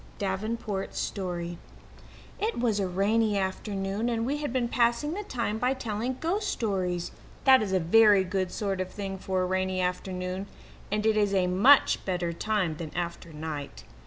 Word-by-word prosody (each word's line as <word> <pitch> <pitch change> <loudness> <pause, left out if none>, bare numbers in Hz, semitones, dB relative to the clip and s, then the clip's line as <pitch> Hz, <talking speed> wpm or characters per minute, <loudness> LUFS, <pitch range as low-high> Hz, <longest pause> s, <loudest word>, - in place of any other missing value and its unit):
Davenport's 200 +1 -3
Story 175 -3 -3 0.8
It 435 - -1
was 225 -4 +1
a 195 - 0
rainy 205 +3 +2
afternoon, 195 +3 -2
and 230 -1 0
we 280 +4 0
had 295 -3 -3
been 250 -1 0
passing 240 +6 +1
the 410 - -3
time 230 - -2
by 255 +3 +1
telling 235 +1 -3
ghost 400 +5 -1
stories. 185 -6 -1 0.3
That 265 -2 +7
is 205 -3 -2
a 190 - +3
very 205 +3 +6
good 185 0 -2
sort 195 -2 -2
of 185 - -3
thing 195 -1 -5
for 185 -1 -1
a - - +1
rainy 185 0 0
afternoon, 180 +1 -2 0.4
and 210 +1 0
it 220 -1 +3
is 205 -2 +2
a 185 -1 +3
much 200 +11 +5
better 175 -2 -1
time 185 -3 -1
than 160 -2 -5
after 170 -1 -4
night. 150 -2 -6
195 Hz, 170 wpm, -28 LUFS, 185-230 Hz, 0.8 s, That